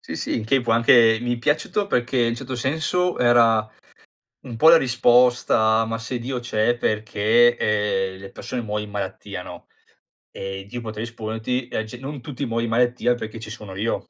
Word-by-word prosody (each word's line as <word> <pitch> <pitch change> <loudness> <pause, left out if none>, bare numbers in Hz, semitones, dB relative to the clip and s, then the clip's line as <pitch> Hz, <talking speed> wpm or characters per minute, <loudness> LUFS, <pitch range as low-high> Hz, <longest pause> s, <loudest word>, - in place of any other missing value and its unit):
Sì, - - -7
sì, - - -2
in 110 - -3
che 135 +4 +2
può 120 -2 +1
anche 115 -1 +5
mi 120 0 0
è - - -9
piaciuto 155 - 0
perché 125 -7 -1
in 120 - +3
un 115 - -1
certo 130 +1 -6
senso 160 +8 -1
era 115 -3 +4 0.8
un 120 - -7
po' 155 +8 +6
la 165 - +8
risposta: 120 -4 +3
"Ma 115 0 -4
se 120 +2 -4
Dio 125 +2 -4
c'è 120 0 0
perché, 110 +2 +2
ehm, 105 -4 -1
le 95 0 -11
persone 125 - -5
muoiono 105 -1 -3
in 105 - -10
malattia", 105 -1 -6
no, - - -11 0.6
e 95 0 -7
Dio 120 +2 -6
poteva 110 -1 -6
risponderti: 115 +2 -4
"e 110 - -3
c 110 - -12
non 135 +1 -7
tutti 140 +2 -5
muoion 115 -1 -2
di - - -4
malattia 120 +1 +1
perché 115 -1 -7
ci 110 -1 -9
sono 105 -4 -9
io". 110 +4 -3
115 Hz, 195 wpm, -22 LUFS, 110-125 Hz, 0.8 s, la